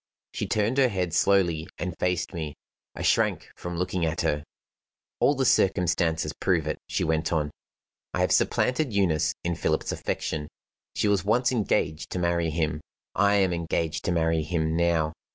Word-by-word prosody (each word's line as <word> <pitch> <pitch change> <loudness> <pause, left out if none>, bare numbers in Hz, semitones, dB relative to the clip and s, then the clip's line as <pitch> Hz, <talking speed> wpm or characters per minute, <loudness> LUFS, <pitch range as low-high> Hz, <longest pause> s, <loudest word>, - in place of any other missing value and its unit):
She - - -3
turned 110 +5 +1
her 130 - +6
head 90 -7 -2
slowly 85 -5 +2
and 90 -1 -4
faced 90 +1 0
me. 80 -4 -4 0.4
I - - -5
shrank - - +1
from 90 -1 -6
looking 90 0 -1
at 80 -1 0
her. 75 0 0 0.8
"All 145 - +4
the 135 -1 0
circumstances 85 -6 +2
prove 85 -5 0
it," 75 - -3
she - - 0
went 80 0 0
on. 75 -3 0 0.6
"I - - -1
have - - +2
supplanted 125 -1 +2
Eunice 90 -7 +2
in 85 - 0
Philip's - - -1
affection. 75 -1 -3 0.5
She - - +1
was 100 -2 +2
once 120 +5 +2
engaged 80 -9 0
to - - -2
marry 85 -1 +1
him; 75 -1 -1 0.3
I 100 +1 +3
am 95 -3 +3
engaged 85 -1 -2
to - - +1
marry 80 -1 +2
him 80 0 -1
now. 85 -2 +1
85 Hz, 170 wpm, -26 LUFS, 80-95 Hz, 0.8 s, her